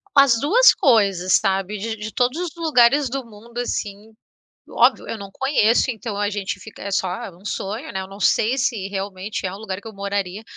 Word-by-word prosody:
As 275 -5 +6
duas 450 - +6
coisas, 195 -7 +3
sabe? 195 0 0
De 220 +2 -4
de 215 +1 -7
todos 250 +5 0
os 355 -3 -3
lugares 285 -4 +3
do 270 0 -4
mundo 230 +2 -10
assim 215 -2 -4 0.6
óbvio, - - +3
eu 225 - -4
não 200 -1 -9
conheço, 260 -2 +2
então 225 -2 -5
a 205 0 0
gente 200 -2 -3
fica 215 +3 -12
é 200 - -4
só, 190 -2 0
é - - -7
um 185 - -20
sonho, 215 +8 -4
né. 190 - -3
Eu 190 - -7
não 195 +1 -11
sei 230 +5 +2
se 230 -7 -1
realmente 195 +1 -5
é 180 - -4
um 195 - -8
lugar 195 -3 -5
que 205 - -17
eu - - -10
moraria, 200 0 -3
210 Hz, 210 wpm, -21 LUFS, 195-245 Hz, 0.6 s, As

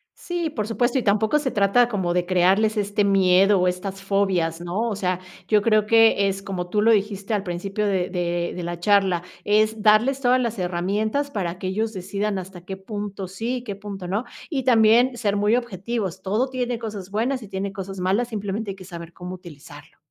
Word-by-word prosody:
Sí, 345 -2 -3
por 215 -8 -3
supuesto, 240 +3 +1
y 255 - 0
tampoco 210 +7 +2
se 285 -3 -1
trata 205 +4 +3
como 190 -7 -1
de 180 0 +1
crearles 190 +4 +3
este 205 0 0
miedo 195 0 +4
o 180 - +2
estas 190 +2 -3
fobias, 190 -4 0
¿no? 190 +7 -2
O 215 - -2
sea, 185 -2 -1 0.3
yo 210 -1 +4
creo 215 -1 +3
que 225 -2 +5
es 195 0 -2
como 185 -2 -5
tú 210 +3 +1
lo 225 +2 +5
dijiste 200 -1 0
al 200 - -2
principio, 195 +3 -3
de 190 -3 0
de 175 -1 -2
de 180 - -5
la 175 0 -4
charla. 190 -2 +3 0.2
Es 215 +1 +2
darles 225 +5 +4
todas 255 -1 +3
las 235 -2 -2
herramientas 200 +9 -1
para 185 -7 -3
que 185 - -4
ellos 220 +4 -1
decidan 195 +2 -2
hasta 185 -1 -9
qué 190 +2 -7
punto 200 -1 -6
sí, 225 +7 -3
y 245 - -7
qué 205 -5 -5
punto 200 -2 -7
no 200 +6 -1 0.3
y 275 -5 -2
también 240 +1 +5
ser 205 -3 0
muy 205 +2 +3
objetivos. 210 -4 -3
Todo 215 +7 0
tiene 250 -2 -2
cosas 205 -4 -6
buenas 240 +4 -1
y - - -10
tiene 195 0 -4
cosas 195 -1 -7
malas, 195 +7 +1
simplemente 205 -1 -3
hay - - -8
que 190 -1 -12
saber 170 -2 -9
cómo 180 0 -7
utilizarlo. 170 -6 -13
200 Hz, 205 wpm, -23 LUFS, 185-220 Hz, 0.3 s, que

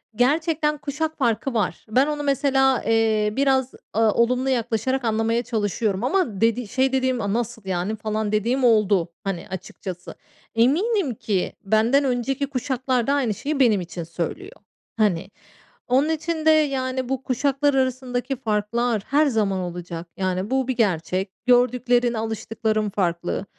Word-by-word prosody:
gerçekten 300 +4 +1
kuşak 305 +2 -3
farkı 240 0 0
var. 220 -3 -1
Ben 260 +6 +3
onu 295 -1 -2
mesela, 270 -2 +2
eee, 220 -2 +2
biraz, 265 -1 +2 0.2
a 220 0 +3
olumlu 250 +4 +1
yaklaşarak 245 +1 0
anlamaya 225 +1 +1
çalışıyorum 210 -2 -1
ama 255 - 0
dedi 230 +1 +2
şey 260 +4 +1
dediğim, 260 -2 +1
aaa, 200 -1 -1
"Nasıl 235 0 -2
yani?" 190 +3 -2
falan 215 -1 -2
dediğim 235 +5 +1
oldu. 210 -7 +3
Hani, 195 -4 -4
açıkçası 185 -1 -7 0.4
eminim 305 - +2
ki 200 -3 -2
benden 220 +7 +3
önceki 270 +2 -1
kuşaklar 255 -2 -1
da 280 - +3
aynı 260 -7 +1
şeyi 290 +7 -3
benim 225 -7 +4
için 175 0 -6
söylüyor. 170 - -5 0.5
Hani, 190 -5 +1 0.6
onun 265 +5 +3
için 320 0 -2
de 315 - +7
yani 260 -4 +1
bu 265 -1 -2
kuşaklar 280 +3 +1
arasındaki 260 0 -1
farklar 225 -1 -1
her 295 +3 +3
zaman 210 -7 0
olacak. 175 -1 -6
Yani 185 +2 -2
bu 265 -1 +1
bir 260 - -1
gerçek. 185 -2 0
Gördüklerin, 245 -1 +3
alıştıkların 220 -1 -2
farklı. 180 -1 -2
240 Hz, 140 wpm, -23 LUFS, 210-265 Hz, 0.6 s, de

